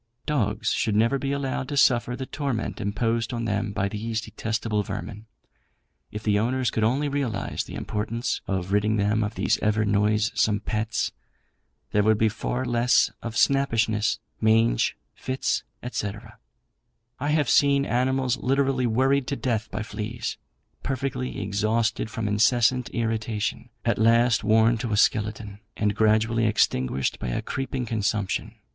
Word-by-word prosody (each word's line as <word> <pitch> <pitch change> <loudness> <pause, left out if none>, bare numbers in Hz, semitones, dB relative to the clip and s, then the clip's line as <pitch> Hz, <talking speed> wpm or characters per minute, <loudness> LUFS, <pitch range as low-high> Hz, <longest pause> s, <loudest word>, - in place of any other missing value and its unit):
Dogs 110 -7 0
should 110 -2 0
never 115 +6 +3
be 135 +1 -2
allowed 135 -1 -2
to 145 - -3
suffer 120 -2 +3
the 130 - -5
torment 135 -6 -3
imposed 115 +3 -1
on 115 -1 -3
them 105 -1 -1
by 100 -1 -1
these 110 +2 -3
detestable 110 -1 -2
vermin. 105 +2 -6 0.8
If 105 +1 -6
the 105 -1 +2
owners 125 +2 0
could 110 - -1
only 135 +7 +2
realise 135 -8 -2
the - - -9
importance 115 +3 -2
of 95 -1 -2
ridding 105 +2 +2
them 105 +2 +1
of 105 +2 -3
these - - +1
ever 105 +1 +1
noisome 105 0 +2
pests, 110 0 -1 0.8
there 105 - +3
would 110 +1 +3
be 110 0 +3
far 125 +4 -3
less 120 0 +3
of 115 -2 -5
snappishness, 115 -5 +2 0.2
mange, 110 - +3 0.2
fits, 130 0 -1 0.3
&c. 100 -4 -2 1.1
I 145 +3 -1
have 150 -2 +2
seen 140 +1 +4
animals 130 0 +1
literally 135 -1 +1
worried 130 +4 +2
to 140 - -1
death 115 -5 -2
by 105 +1 -4
fleas, 110 +2 -4 0.5
perfectly 130 -1 -3
exhausted 110 +3 0
from 110 -1 -3
incessant 115 +4 +3
irritation, 110 0 -2 0.2
at 115 - +1
last 115 +1 +4
worn 110 +2 +4
to 115 -2 -2
a - - +1
skeleton, 105 -1 0 0.2
and 105 -1 0
gradually 110 +1 +3
extinguished 65 -10 +1
by - - -4
a - - -2
creeping 135 -1 -3
consumption. 105 -3 -1
110 Hz, 145 wpm, -25 LUFS, 105-125 Hz, 1.1 s, seen